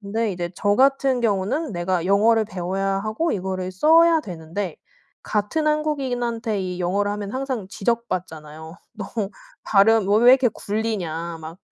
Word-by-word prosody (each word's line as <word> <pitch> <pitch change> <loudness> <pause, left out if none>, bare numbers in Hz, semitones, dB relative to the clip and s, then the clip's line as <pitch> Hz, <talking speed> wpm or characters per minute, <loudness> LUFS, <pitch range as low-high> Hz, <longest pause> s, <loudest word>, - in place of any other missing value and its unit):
근데 215 +1 -2
이제 175 -1 -4
저 205 +2 +1
같은 270 -1 +3
경우는 225 +7 -1
내가 175 -1 -1
영어를 220 +3 +4
배워야 195 +1 -2
하고 215 +12 -1
이거를 185 -1 -3
써야 325 - +5
되는데 175 - -6 0.5
같은 215 +10 -1
한국인한테 245 -8 -1
이 180 -1 -4
영어를 200 +3 0
하면 205 0 -5
항상 260 -6 -3
지적받잖아요. 165 -8 -4 0.2
"너 210 - -6 0.6
발음 210 0 +4
왜 205 - +4
왜 245 - +9
이렇게 260 -1 +4
굴리냐." 185 -7 -4
막 160 +2 -9
205 Hz, 310 characters per minute, -22 LUFS, 185-240 Hz, 0.6 s, 왜